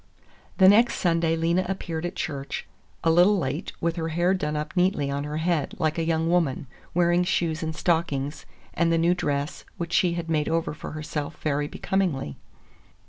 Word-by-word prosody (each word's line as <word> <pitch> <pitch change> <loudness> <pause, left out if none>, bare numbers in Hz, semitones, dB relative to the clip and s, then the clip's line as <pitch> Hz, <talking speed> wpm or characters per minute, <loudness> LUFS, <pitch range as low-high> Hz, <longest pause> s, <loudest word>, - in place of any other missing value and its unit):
The 190 - +7
next 230 +5 +6
Sunday 165 -2 +1
Lena 170 +3 +1
appeared 175 -3 -3
at 175 - -8
church, 140 -1 -4 0.4
a 165 - +4
little 180 +5 +5
late, 145 -1 -2
with 170 +1 -1
her 165 -1 -1
hair 175 +3 +2
done 150 -5 -2
up 150 +3 -4
neatly 180 -6 +2
on 140 +1 -2
her 150 +1 -3
head, 160 -3 0
like 160 -1 0
a - - +1
young 160 0 +1
woman, 165 -6 +1 0.3
wearing 175 0 +3
shoes 170 -2 0
and 160 -1 -3
stockings, 150 -5 -1 0.3
and 170 -1 +2
the 165 - +3
new 170 +2 +3
dress, 145 -4 -2
which 170 0 -4
she 175 -2 +3
had 170 -1 -4
made 155 -2 0
over 165 -1 0
for 150 - -8
herself 155 0 -5
very 145 -1 0
becomingly. 160 - -1
165 Hz, 185 wpm, -25 LUFS, 150-175 Hz, 0.4 s, The